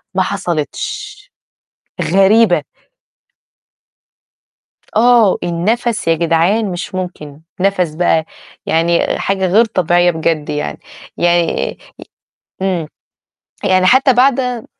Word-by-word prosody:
ما 190 Hz, -, +2 dB
حصلتش، 200 Hz, -, -4 dB, 0.9 s
غريبة. 195 Hz, -3 st, +4 dB, 2.3 s
آه، 230 Hz, -3 st, +4 dB
النَفَس 215 Hz, +6 st, -1 dB
يا 165 Hz, -, +3 dB
جدعان 170 Hz, +6 st, +1 dB
مش 175 Hz, +1 st, -6 dB
ممكن، 155 Hz, -5 st, -7 dB, 0.2 s
نَفَس 180 Hz, -4 st, 0 dB
بقى، 160 Hz, -2 st, +1 dB, 0.4 s
يعني 170 Hz, +1 st, +1 dB
حاجة 195 Hz, -1 st, -1 dB
غير 215 Hz, +6 st, +4 dB
طبيعية 175 Hz, -3 st, +2 dB
بجد 160 Hz, -2 st, -2 dB
يعني، 150 Hz, -, -4 dB, 0.4 s
يعني 175 Hz, -1 st, +1 dB
ي -, -, -14 dB, 0.9 s
إمم، 180 Hz, -4 st, -1 dB, 0.8 s
يعني 185 Hz, -1 st, +2 dB
حتى 260 Hz, +5 st, +4 dB
بعد 250 Hz, -2 st, +1 dB
185 Hz, 95 wpm, -15 LUFS, 170-220 Hz, 2.3 s, غريبة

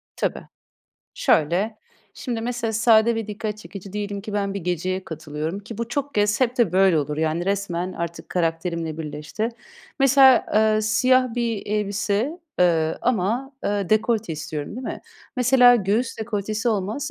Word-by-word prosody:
Tabii. -, -, -3 dB, 0.7 s
Şöyle. 185 Hz, +8 st, +1 dB, 0.4 s
Şimdi 235 Hz, -4 st, -4 dB
mesela 235 Hz, -1 st, -2 dB
sade 225 Hz, +1 st, +4 dB
ve 225 Hz, -1 st, -3 dB
dikkat 210 Hz, 0 st, -4 dB
çekici 195 Hz, -2 st, -10 dB
diyelim 205 Hz, -1 st, -4 dB
ki 210 Hz, +1 st, -8 dB
ben 200 Hz, -1 st, -1 dB
bir 200 Hz, -, -2 dB
geceye 180 Hz, +2 st, -2 dB
katılıyorum 160 Hz, +3 st, -5 dB
ki 220 Hz, +2 st, -10 dB
bu 235 Hz, 0 st, -3 dB
çok 285 Hz, +2 st, -3 dB
kez 210 Hz, +3 st, +2 dB
hep 250 Hz, 0 st, +1 dB
de 210 Hz, -8 st, +3 dB
böyle 190 Hz, -3 st, +4 dB
olur. 150 Hz, 0 st, -2 dB
Yani 160 Hz, +2 st, 0 dB
resmen 185 Hz, -2 st, -1 dB
artık 170 Hz, 0 st, -6 dB
karakterimle 165 Hz, -2 st, -2 dB
birleşti. 150 Hz, +8 st, -4 dB, 0.5 s
Mesela, 270 Hz, -2 st, +6 dB
ııı, 215 Hz, 0 st, +3 dB
siyah 255 Hz, +3 st, +3 dB
bir 230 Hz, -4 st, -2 dB
elbise, 210 Hz, -, -1 dB, 0.2 s
ııı, 160 Hz, -3 st, +2 dB
ama, 245 Hz, +4 st, 0 dB
ııı, 200 Hz, -3 st, -1 dB
dekolte 220 Hz, -3 st, +1 dB
istiyorum, 150 Hz, -1 st, -5 dB
değil 255 Hz, -, -6 dB
mi? -, -, -5 dB, 0.4 s
Mesela 250 Hz, -1 st, +6 dB
göğüs 215 Hz, +4 st, -1 dB
dekoltesi 215 Hz, +1 st, -2 dB
olmaz 215 Hz, +6 st, -2 dB
210 Hz, 150 wpm, -23 LUFS, 180-230 Hz, 0.7 s, Mesela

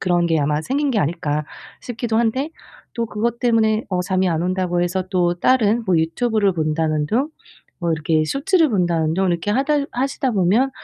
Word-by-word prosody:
그런 175 Hz, -2 st, +1 dB
게 165 Hz, -2 st, +1 dB
아마 150 Hz, +1 st, 0 dB
생긴 280 Hz, -, 0 dB
게 225 Hz, -, +1 dB
아닐까 150 Hz, -2 st, -1 dB, 0.4 s
싶기도 235 Hz, -2 st, -3 dB
한데 255 Hz, +6 st, 0 dB, 0.4 s
또 235 Hz, -1 st, -2 dB
그것 230 Hz, +2 st, -2 dB
때문에 225 Hz, -2 st, +2 dB
어 180 Hz, -2 st, -1 dB
잠이 185 Hz, +1 st, 0 dB
안 165 Hz, -1 st, 0 dB
온다고 180 Hz, -1 st, -1 dB
해서 180 Hz, +1 st, -1 dB
또 175 Hz, -2 st, +1 dB
다른 235 Hz, -2 st, +3 dB
뭐 185 Hz, -4 st, +2 dB
유튜브를 205 Hz, +5 st, +1 dB
본다는 155 Hz, -2 st, 0 dB
둥 255 Hz, -, 0 dB, 0.5 s
뭐 170 Hz, -2 st, -1 dB
이렇게 155 Hz, 0 st, +1 dB
쇼츠를 315 Hz, -, +1 dB
본다는 170 Hz, -6 st, +1 dB
둥 190 Hz, +3 st, +1 dB
이렇게 175 Hz, +3 st, -1 dB
하다 280 Hz, +5 st, +1 dB
하시다 265 Hz, +1 st, -1 dB
보면 215 Hz, +6 st, +2 dB
190 Hz, 355 characters per minute, -20 LUFS, 170-235 Hz, 0.5 s, 다른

